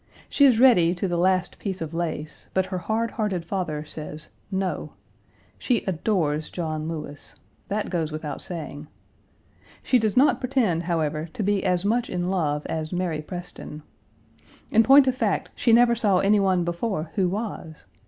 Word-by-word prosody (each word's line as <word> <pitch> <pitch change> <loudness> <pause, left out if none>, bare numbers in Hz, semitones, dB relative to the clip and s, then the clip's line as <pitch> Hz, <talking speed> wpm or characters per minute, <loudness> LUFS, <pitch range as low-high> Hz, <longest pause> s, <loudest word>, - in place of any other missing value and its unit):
She 285 - +4
is 250 -5 +5
ready 180 -10 +5
to 185 +2 -2
the 175 - -1
last 185 +1 +1
piece 190 -2 -4
of 160 0 -5
lace, 160 -2 -4
but 190 0 +2
her 185 -1 -4
hard 225 +4 -1
hearted 195 -6 -2
father 165 -5 -3
says 155 0 -5 0.2
"No." 190 -1 -3 0.7
She 245 -4 +1
adores 160 -5 0
John 155 -3 -3
Lewis. 155 -3 -7 0.3
That 210 +1 -2
goes 165 -4 -1
without 155 -2 -5
saying. 155 -4 -7 1.0
She 255 - +3
does 215 0 0
not 260 -1 +5
pretend, 245 -11 +1
however, 155 -1 -1
to 215 - -3
be 200 0 +1
as 180 -1 +1
much 235 +3 +1
in 180 0 -2
love 150 -5 -1
as 155 -1 -3
Mary 175 -4 -1
Preston. 175 -2 -7 0.9
In 225 - +6
point 270 +4 +7
of 260 - +2
fact, 255 - -1
she 235 - +1
never 235 +1 +6
saw 210 -5 +2
any 200 +3 +4
one 190 -3 +2
before 170 -1 -3
who 185 -3 +1
was. 190 -6 -5
180 Hz, 165 wpm, -25 LUFS, 160-215 Hz, 1.0 s, point